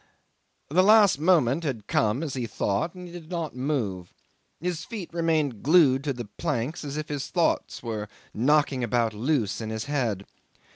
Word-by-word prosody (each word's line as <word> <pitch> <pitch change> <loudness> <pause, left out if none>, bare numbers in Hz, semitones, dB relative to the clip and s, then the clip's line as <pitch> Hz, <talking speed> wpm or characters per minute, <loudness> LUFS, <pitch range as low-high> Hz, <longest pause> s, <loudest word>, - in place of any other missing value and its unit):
'The 180 +4 +5
last 205 -5 +6
moment 160 -3 +3
had 125 -9 -3
come, 110 +7 +1
as 150 -5 -4
he 125 -3 -3
thought, 105 - -1
and 180 0 -9
he 175 - -10
did 165 -2 -10
not 170 -6 -3
move. 120 - -2 0.5
His 175 0 -3
feet 200 -8 -7
remained 155 -8 0
glued 145 -4 +5
to 145 - +1
the 120 -2 -6
planks 135 +5 -3
if 150 +1 -4
his 145 -2 -3
thoughts 170 -2 0
were 110 -3 -4 0.2
knocking 135 +1 +2
about 115 -1 +1
loose 115 -2 0
in 110 - -4
his 110 0 -4
head. 120 -9 -1
140 Hz, 165 wpm, -26 LUFS, 115-165 Hz, 0.5 s, last